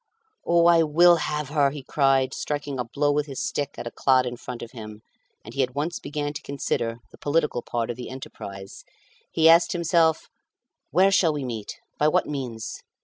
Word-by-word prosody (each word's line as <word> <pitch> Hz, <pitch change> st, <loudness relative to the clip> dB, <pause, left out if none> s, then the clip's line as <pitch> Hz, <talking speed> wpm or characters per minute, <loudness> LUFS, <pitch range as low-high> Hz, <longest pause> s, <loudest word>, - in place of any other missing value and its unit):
"Oh, 170 Hz, 0 st, +3 dB
I 170 Hz, -1 st, +6 dB
will 170 Hz, +3 st, +5 dB
have 150 Hz, -3 st, -3 dB
her," 145 Hz, -2 st, +3 dB
he 140 Hz, -1 st, -8 dB
cried, 135 Hz, -1 st, +2 dB
striking 145 Hz, -2 st, -4 dB
a -, -, 0 dB
blow 145 Hz, +5 st, 0 dB
with 150 Hz, +1 st, 0 dB
his 135 Hz, -2 st, -6 dB
stick 145 Hz, -1 st, -3 dB
at -, -, -6 dB
a 120 Hz, -, -5 dB
clod 130 Hz, -1 st, +3 dB
in 125 Hz, 0 st, -4 dB
front 125 Hz, 0 st, -8 dB
of 115 Hz, -, -9 dB
him. 110 Hz, -3 st, -10 dB, 0.4 s
And 115 Hz, -, -10 dB
he 135 Hz, -, 0 dB
at 125 Hz, 0 st, -1 dB
once 155 Hz, +4 st, -2 dB
began 145 Hz, 0 st, -4 dB
to -, -, -6 dB
consider 115 Hz, -4 st, -2 dB
the -, -, -16 dB
political 150 Hz, -4 st, 0 dB
part 120 Hz, -1 st, -2 dB
of 120 Hz, -, -8 dB
the 125 Hz, -, -7 dB
enterprise. 100 Hz, -7 st, -9 dB, 0.5 s
He 160 Hz, 0 st, +4 dB
asked 165 Hz, +1 st, +6 dB
himself 170 Hz, -2 st, +2 dB, 0.6 s
"Where 190 Hz, +4 st, +4 dB
shall 170 Hz, -4 st, +3 dB
we 145 Hz, -3 st, -3 dB
meet? 115 Hz, -4 st, -5 dB, 0.2 s
By 150 Hz, -, +4 dB
what 155 Hz, -, +2 dB
means? 125 Hz, -6 st, -5 dB
140 Hz, 200 wpm, -25 LUFS, 125-155 Hz, 0.6 s, I